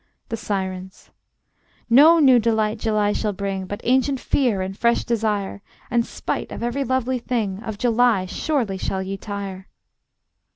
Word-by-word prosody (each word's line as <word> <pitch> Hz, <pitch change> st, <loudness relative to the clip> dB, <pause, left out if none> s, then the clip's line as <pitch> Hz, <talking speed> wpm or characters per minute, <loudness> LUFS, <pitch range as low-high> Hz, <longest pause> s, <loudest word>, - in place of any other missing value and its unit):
The -, -, -2 dB
Sirens: 190 Hz, -3 st, -5 dB, 0.8 s
No 295 Hz, +8 st, +7 dB
new 265 Hz, -6 st, +6 dB
delight 220 Hz, -1 st, 0 dB
July 210 Hz, -2 st, +1 dB
shall 210 Hz, -2 st, -1 dB
bring, 195 Hz, -1 st, -4 dB
But 205 Hz, -, -6 dB
ancient 260 Hz, +2 st, +2 dB
fear 245 Hz, -8 st, +1 dB
and 190 Hz, +1 st, -5 dB
fresh 235 Hz, +3 st, +2 dB
desire; 210 Hz, -4 st, -1 dB, 0.3 s
And 240 Hz, -1 st, +3 dB
spite -, -, -4 dB
of -, -, -6 dB
every 240 Hz, +4 st, -1 dB
lovely 260 Hz, 0 st, 0 dB
thing, 215 Hz, -5 st, -2 dB
Of 220 Hz, -3 st, -6 dB
July 235 Hz, -4 st, +2 dB
surely 220 Hz, -, -2 dB
shall 190 Hz, 0 st, -2 dB
ye 195 Hz, +1 st, -4 dB
tire. 195 Hz, -2 st, -6 dB
220 Hz, 150 wpm, -22 LUFS, 195-245 Hz, 0.8 s, No